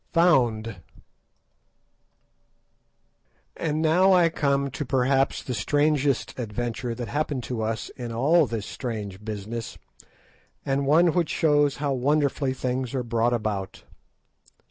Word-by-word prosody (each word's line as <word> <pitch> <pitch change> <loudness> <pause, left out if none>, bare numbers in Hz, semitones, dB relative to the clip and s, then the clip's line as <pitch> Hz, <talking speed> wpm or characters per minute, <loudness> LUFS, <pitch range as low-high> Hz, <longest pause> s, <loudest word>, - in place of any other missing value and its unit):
FOUND 120 - +2 2.8
And 155 0 -1
now 180 +5 +4
I 175 -2 +5
come 140 -3 0
to 135 - -4
perhaps 135 +1 +1
the 125 - -4
strangest 145 +3 0
adventure 120 +1 -3
that 120 0 -5
happened 145 -2 -2
to 120 -2 -4
us 110 0 -3
in 120 -2 -7
all 145 +7 +3
this 110 -3 -4
strange 105 -6 -6
business, 110 +2 -6 0.9
and 135 0 0
one 165 +3 +4
which 175 -3 +1
shows 145 -2 +2
how 145 -1 -1
wonderfully 140 0 +1
things 130 0 -3
are 130 - -1
brought 115 0 +1
about. 105 -4 -3
130 Hz, 120 wpm, -25 LUFS, 115-145 Hz, 2.8 s, I